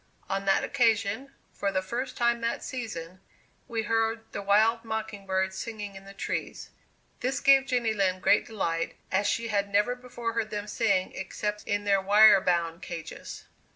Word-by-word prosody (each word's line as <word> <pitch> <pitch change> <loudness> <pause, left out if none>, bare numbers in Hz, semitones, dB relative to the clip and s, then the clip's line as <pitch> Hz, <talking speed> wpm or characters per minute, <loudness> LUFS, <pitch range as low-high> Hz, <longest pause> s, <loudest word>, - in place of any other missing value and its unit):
On 195 0 -2
that 195 - +3
occasion, 230 +1 +1 0.2
for 200 - -1
the 185 -1 0
first 250 +6 -4
time 235 0 +2
that 230 0 -2
season, 185 -9 -6 0.5
we 225 -2 -2
heard 225 +1 0
the - - -4
wild 220 +3 +3
mocking 220 -3 -5
birds 190 0 0
singing 210 -3 -6
in 195 0 -11
the 195 - -11
trees. - - -4 0.5
This 265 +2 -1
gave 275 -2 +5
Jenny 245 -5 +1
Lind 185 -3 0
great - - +4
delight, 170 -7 -2 0.2
as 200 +2 +2
she 230 +3 -1
had 200 -1 0
never 210 +4 +2
before 240 -2 -5
heard 220 -1 -1
them 205 -1 -4
sing 200 -3 +1
except 210 +2 -4
in 205 0 0
their 200 -1 +3
wire 205 +1 +7
bound 170 -1 0
cages. 165 -2 -7
210 Hz, 170 wpm, -28 LUFS, 195-230 Hz, 0.5 s, wire